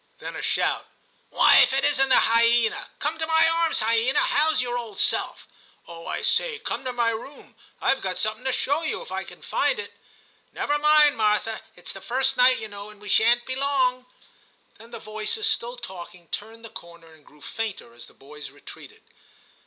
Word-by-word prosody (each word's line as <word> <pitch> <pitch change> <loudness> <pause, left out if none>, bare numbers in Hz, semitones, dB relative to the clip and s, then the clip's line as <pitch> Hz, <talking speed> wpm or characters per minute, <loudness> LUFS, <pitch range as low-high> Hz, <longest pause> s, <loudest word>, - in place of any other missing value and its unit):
Then - - -8
a - - -5
shout. - - -1 0.4
*Why, - - +5
if - - +5
it 270 - +1
isn't 270 -2 +3
the 260 - +6
hyena! 230 0 +2
Come 310 +2 -3
to 320 - -2
my 320 0 +4
arms, 330 -4 +1
hyena; 230 +3 +2
how's 310 +1 +2
your 245 -1 -2
old 230 -5 -6
self? - - -1 0.4
Oh! 165 -1 -11
I - - -4
say, - - +1
come 440 - -5
to 255 - -2
my 235 -2 0
room; 250 +6 -9 0.3
I - - +3
Ve 265 - -8
got 185 -1 -3
something 215 +2 -3
to 265 - +1
show 285 +4 0
you, 325 +9 -3
if 485 - -13
I - - -3
can - - -13
find - - 0
it. 455 - -7 0.6
Never 295 0 -1
mind, 300 -2 +5
Martha; 215 0 0
it's 180 - -8
the 195 - -11
first 260 +6 0
night, 255 +1 +5
you 220 - -6
know, 205 0 -10
and 210 -1 -14
we 210 0 -10
shan't 235 +4 +3
be 260 - -3
long.' 260 -2 0 0.7
Then 225 +1 -14
the 235 - -8
voices, 215 - -4
still 250 - -1
talking, 180 -5 -10
turned 225 +2 -7
the - - -10
corner 170 -6 -13
and 155 -2 -21
grew 150 - -21
fainter 200 - -6
as 120 - -13
the - - -21
boys 150 +2 -11
retreated. 145 +1 -14
235 Hz, 200 wpm, -24 LUFS, 210-275 Hz, 0.7 s, the